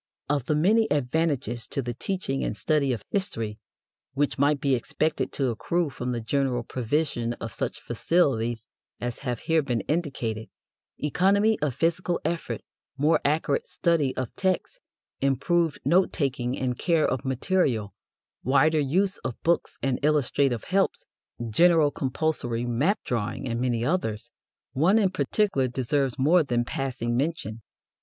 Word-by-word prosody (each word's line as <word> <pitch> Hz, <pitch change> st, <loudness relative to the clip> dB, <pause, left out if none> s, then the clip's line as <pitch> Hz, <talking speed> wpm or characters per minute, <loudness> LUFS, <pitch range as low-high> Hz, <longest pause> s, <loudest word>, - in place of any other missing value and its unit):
Of 140 Hz, -3 st, 0 dB
the 150 Hz, -, +2 dB
many 215 Hz, +8 st, +3 dB
advantages 140 Hz, -4 st, 0 dB
to 140 Hz, -, -2 dB
the 120 Hz, 0 st, -3 dB
teaching 135 Hz, -, -2 dB
and -, -, -2 dB
study 150 Hz, -4 st, +1 dB
of 115 Hz, -5 st, -3 dB
history 115 Hz, -, -2 dB, 0.6 s
which 145 Hz, -1 st, 0 dB
might 145 Hz, +1 st, +3 dB
be 135 Hz, -1 st, +1 dB
expected 150 Hz, +5 st, -1 dB
to 135 Hz, -3 st, 0 dB
accrue 165 Hz, +7 st, -1 dB
from 125 Hz, 0 st, -4 dB
the 120 Hz, -, -2 dB
general 125 Hz, +1 st, 0 dB
provision 120 Hz, -1 st, -1 dB
of 115 Hz, -3 st, -7 dB
such -, -, -3 dB
facilities 120 Hz, -9 st, 0 dB, 0.3 s
as 120 Hz, -1 st, -4 dB
have 125 Hz, -4 st, -3 dB
here 160 Hz, -1 st, +2 dB
been 125 Hz, -6 st, -1 dB
indicated 125 Hz, -, -2 dB, 0.5 s
economy 200 Hz, +8 st, +2 dB
of 145 Hz, -5 st, 0 dB
physical 170 Hz, +1 st, 0 dB
effort, 170 Hz, 0 st, -2 dB, 0.4 s
more 150 Hz, +3 st, +3 dB
accurate 160 Hz, -, +1 dB
study 165 Hz, -, +1 dB
of 130 Hz, -3 st, -3 dB
texts, 190 Hz, -, -1 dB, 0.4 s
improved 160 Hz, +4 st, +1 dB
note 185 Hz, +2 st, +4 dB
taking 130 Hz, -4 st, -1 dB
and 125 Hz, -2 st, -2 dB
care 165 Hz, -3 st, +2 dB
of 130 Hz, -1 st, -1 dB
material, 130 Hz, -, 0 dB, 0.5 s
wider 140 Hz, +5 st, +4 dB
use 185 Hz, +8 st, +1 dB
of 125 Hz, -3 st, -5 dB
books 170 Hz, 0 st, +1 dB
and 135 Hz, 0 st, 0 dB
illustrative 140 Hz, -4 st, +2 dB
helps, 195 Hz, +1 st, 0 dB, 0.4 s
general 160 Hz, +5 st, +4 dB
compulsory 130 Hz, -4 st, -1 dB
map 140 Hz, -, +1 dB
drawing, 115 Hz, +1 st, -2 dB
and 115 Hz, 0 st, -2 dB
many 120 Hz, -2 st, 0 dB
others 125 Hz, -, -1 dB, 0.4 s
one 165 Hz, +10 st, +4 dB
in 200 Hz, -4 st, +3 dB
particular 185 Hz, -7 st, +1 dB
deserves 130 Hz, +1 st, -1 dB
more 160 Hz, +7 st, +5 dB
than 120 Hz, -5 st, 0 dB
passing 125 Hz, -3 st, -2 dB
mention. 140 Hz, -5 st, -2 dB
140 Hz, 145 wpm, -26 LUFS, 120-165 Hz, 0.6 s, more